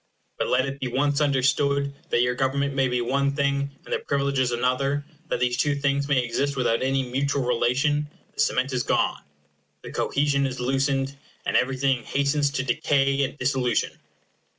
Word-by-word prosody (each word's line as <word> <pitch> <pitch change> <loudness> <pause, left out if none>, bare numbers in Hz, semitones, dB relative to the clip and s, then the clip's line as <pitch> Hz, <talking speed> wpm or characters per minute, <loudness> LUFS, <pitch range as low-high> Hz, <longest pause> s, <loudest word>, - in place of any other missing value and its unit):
But - - 0
let 130 +1 +2
it 135 0 -5
be 130 - -2
once 140 +4 +1
understood 140 0 +2 0.2
that 120 - +3
your 125 0 +1
government 135 +2 0
may 135 -1 +2
be 125 -1 0
one 140 +3 0
thing, 140 -1 0 0.2
and - - -5
their - - +1
privileges 140 -3 0
another, 130 +4 0 0.2
that - - -1
these 125 -1 +1
two 145 +2 +1
things 140 0 0
may 135 -3 +2
exist 140 +4 -1
without 120 -3 +1
any 135 +1 +1
mutual 135 +2 -1
relation, 135 +5 +1 0.3
the - - -17
cement 130 +1 +1
is 125 - +1
gone - - 0 0.6
the - - -8
cohesion 140 -1 +1
is 130 -1 -6
loosened 135 +2 0 0.3
and - - -1
everything 130 0 +2
hastens 140 +3 +1
to 140 -1 -2
decay 135 +2 +1
and 135 - -3
dissolution. 125 -2 0
135 Hz, 175 wpm, -25 LUFS, 125-140 Hz, 0.6 s, that